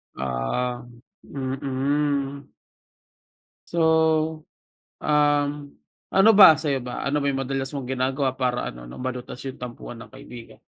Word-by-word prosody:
Ah, 65 - -2 0.4
mm. 140 +1 -2 1.2
So, 160 -1 +2 0.6
um, 145 -1 +3 0.6
ano 195 +3 +5
ba? 190 -7 +9
Sa'yo 145 -3 -1
ba? 125 0 -6
Ano 145 +1 0
ba 140 - 0
yung 135 -1 -1
madalas 135 0 -2
mong 135 - -4
ginagawa, 130 +1 -1
para 125 -1 -2
ano, - - -12
'no, - - -10
malutas 125 -1 -5
yung 135 -1 -7
tampuhan 120 -1 -8
ng - - -11
kaibigan? 120 -2 -12
135 Hz, 125 wpm, -24 LUFS, 125-150 Hz, 1.2 s, ba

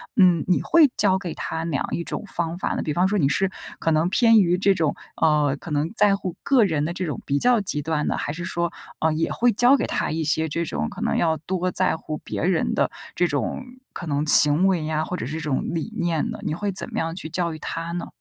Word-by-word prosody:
嗯， 180 -5 +4
你 180 - +2
会 320 -4 +5
教 190 -2 +3
给 175 -4 -5
他 160 - -4
哪 165 -4 -2
样 135 - -1
一 - - -2
种 - - -4
方 170 -2 -3
法 - - -2
呢？ - - -2
比 150 - -2
方 180 +3 +2
说， 210 - 0
你 150 -8 +2
是 190 +7 0 0.3
可 165 - 0
能 160 +2 +2
偏 225 +2 +5
于 180 -2 +2
这 195 +1 +3
种， 160 -5 0 0.3
呃， 150 -3 +2
可 165 - -10
能 150 +3 -1
在 205 -1 +4
乎 185 -3 -5
个 265 -4 +4
人 155 -6 0
的 170 - -3
这 185 - -3
种 155 - -4
比 140 0 0
较 245 +2 +4
极 165 -7 -1
端 155 0 -2
的， - - -1
还 - - -3
是 170 +1 -6
说， 170 0 -2 0.3
呃， 160 0 +2
也 160 +1 -1
会 245 0 +2
教 245 +6 +5
给 - - -1
他 - - -2
一 160 0 -2
些 160 +1 +1
这 170 +3 -2
种 75 - -3
可 - - -10
能 - - 0
要 160 -1 +2
多 180 +3 -2
在 - - +1
乎 155 -1 -6
别 - - -5
人 180 -2 +1
的 - - +1 0.3
这 175 - +2
种 145 - -3 0.3
可 - - -7
能 145 0 -1
行 150 +4 +7
为 175 -5 0
呀， 155 0 -1
或 180 - -4
者 - - -4
是 145 - -6
这 - - -7
种 150 -4 -1
理 165 +7 -3
念 170 -3 -1
呢， - - -6
你 - - -2
会 200 +4 -2
怎 190 - -2
么 - - -5
样 165 0 -3
去 175 - -4
教 170 0 -2
育 155 - -9
他 165 +2 -5
呢？ 175 - -4
170 Hz, 285 characters per minute, -23 LUFS, 155-185 Hz, 0.3 s, 行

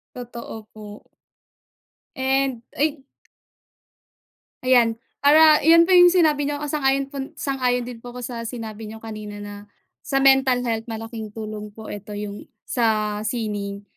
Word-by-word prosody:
Totoo 235 -3 -8
po. 210 -1 -11 1.1
And 265 -2 0
ay 295 0 0 1.6
Ayan. 245 -3 +4 0.2
Para 305 +2 +7
'yon 330 +2 +7
po - - -3
'yong 355 -1 +8
sinabi 305 -5 +3
niyo 290 0 -3
po 295 - -3
sang-ayon 275 -2 +1
po 280 - -7 0.2
sang-ayon 255 -3 0
din 240 -1 -8
po 245 +1 -11
ako 250 - -7
sa 245 -1 -5
sinabi 220 -2 -7
n'yo 220 +1 -10
kanina 215 -2 -7
na 205 0 -7 0.5
sa 270 - 0
mental 265 -2 +4
health 225 -1 -2
malaking 225 -1 -6
tulong 215 -1 -6
po 220 -1 -9
ito, 205 0 -7
'yong 205 0 -6 0.2
sa 215 -3 0
sining 205 -3 -3
240 Hz, 140 wpm, -23 LUFS, 215-270 Hz, 1.6 s, yong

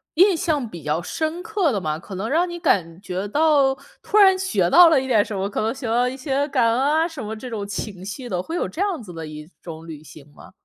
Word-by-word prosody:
印 370 +2 +5
象 310 -8 -1
比 170 -6 -10
较 150 +3 -1
深 315 - -3
刻 395 -7 0
的 200 -4 -2
吗？ 155 -1 -2
可 190 +3 -9
能 205 +5 -3
让 345 +4 +1
你 345 - -6
感 180 - 0
觉 190 +1 -4
到 285 +1 +3 0.3
突 425 - -1
然 385 -2 +7
学 380 0 0
到 350 -1 +8
了 295 -5 +3
一 265 - -5
点 225 -5 +4
什 210 - -6
么？ 195 +1 -2
可 - - -3
能 220 +1 0
学 265 -2 -6
到 240 +2 +2
一 255 - -4
些 275 +1 -1
感 235 - +2
恩 250 - 0
啊 310 +4 +2
什 320 -6 -8
么 215 +1 -5
这 250 +3 -8
种 205 -3 -5
情 195 -2 -6
绪 245 +5 -7
的？ 180 -2 -1
会 325 - -6
有 - - -1
这 350 - -5
样 390 -8 -1
子 200 -5 -10
的 165 -1 -7
一 150 +1 -10
种 165 -1 -9
旅 155 -2 -9
行 145 -1 -14
吗？ - - -15
245 Hz, 285 characters per minute, -22 LUFS, -, 0.3 s, 到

